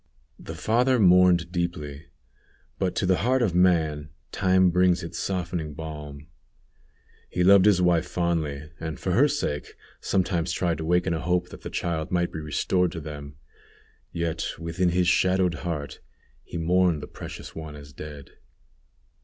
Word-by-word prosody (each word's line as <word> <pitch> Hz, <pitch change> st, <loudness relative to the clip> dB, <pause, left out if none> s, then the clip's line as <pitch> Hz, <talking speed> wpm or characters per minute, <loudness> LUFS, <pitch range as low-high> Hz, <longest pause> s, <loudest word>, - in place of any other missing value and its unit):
The -, -, -8 dB
father 125 Hz, +4 st, +2 dB
mourned 90 Hz, -4 st, +5 dB
deeply, 85 Hz, -4 st, -4 dB, 0.7 s
but 95 Hz, -2 st, -1 dB
to 105 Hz, -, 0 dB
the 90 Hz, 0 st, +3 dB
heart 125 Hz, +8 st, +2 dB
of 100 Hz, -7 st, +1 dB
man 80 Hz, -5 st, +2 dB, 0.2 s
time 95 Hz, -1 st, +3 dB
brings 90 Hz, 0 st, +3 dB
its 85 Hz, -, -6 dB
softening 85 Hz, -5 st, -3 dB
balm. 75 Hz, -2 st, -8 dB, 1.0 s
He 90 Hz, -, 0 dB
loved 100 Hz, +1 st, +7 dB
his 95 Hz, -4 st, +4 dB
wife 85 Hz, -1 st, +2 dB
fondly, 80 Hz, -4 st, -2 dB
and, 80 Hz, -2 st, -5 dB
for 95 Hz, -, -2 dB
her 130 Hz, +11 st, +5 dB
sake, 140 Hz, -, -3 dB, 0.2 s
sometimes 90 Hz, -3 st, 0 dB
tried 85 Hz, -3 st, -1 dB
to 80 Hz, -, -4 dB
waken 90 Hz, +1 st, +2 dB
a 80 Hz, -, -1 dB
hope 90 Hz, +1 st, 0 dB
that -, -, -11 dB
the -, -, -6 dB
child 80 Hz, -3 st, -2 dB
might 85 Hz, -1 st, 0 dB
be 80 Hz, -, -4 dB
restored 85 Hz, +3 st, 0 dB
to 85 Hz, -, -5 dB
them. 75 Hz, -2 st, -8 dB, 0.8 s
Yet 85 Hz, -2 st, -2 dB
within 85 Hz, +2 st, -1 dB
his 90 Hz, 0 st, +1 dB
shadowed 90 Hz, 0 st, +3 dB
heart 80 Hz, -5 st, -4 dB, 0.4 s
he -, -, -7 dB
mourned 85 Hz, -1 st, +2 dB
the -, -, -7 dB
precious -, -, -9 dB
one 80 Hz, -2 st, -8 dB
as 70 Hz, -1 st, -12 dB
dead. 75 Hz, 0 st, -9 dB
85 Hz, 155 wpm, -25 LUFS, 80-90 Hz, 1.0 s, loved